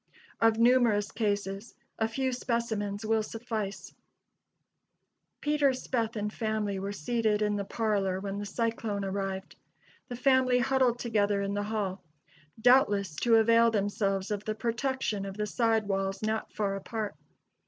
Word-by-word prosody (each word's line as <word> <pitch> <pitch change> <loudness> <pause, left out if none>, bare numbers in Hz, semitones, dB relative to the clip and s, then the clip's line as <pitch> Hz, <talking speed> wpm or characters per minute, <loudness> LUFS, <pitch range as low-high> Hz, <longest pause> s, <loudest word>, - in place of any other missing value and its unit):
Of 225 -1 +4
numerous 230 -4 +4
cases, 205 -1 -2 0.2
a 220 - +2
few 260 +3 -1
specimens 225 -4 -2
will 220 0 +2
suffice: 220 -2 -5 1.5
Peter 295 -1 +3
Speth 235 -3 -2
and 210 0 -3
family 215 -3 -1
were 195 +1 -3
seated 215 +3 0
in 210 0 +1
the 200 -1 -2
parlor 200 -4 0
when 200 0 -4
the 205 - -4
cyclone 220 -2 -2
arrived. 195 0 -4 0.5
The 245 - -4
family 255 0 +3
huddled 260 -1 +2
together 205 -4 +1
in 200 0 -2
the 205 - -1
hall, 195 -4 -2 0.6
doubtless 210 - +4
to 235 -1 +4
avail 230 +1 +5
themselves 200 -2 -1
of 205 -1 -2
the 215 - -2
protection 235 -2 -1
of 195 +1 -7
the 210 - -1
side 225 -1 +1
walls 195 0 -1
not 220 0 -1
far 200 -2 -1
apart. 215 +1 -4
215 Hz, 145 wpm, -29 LUFS, 200-235 Hz, 1.5 s, avail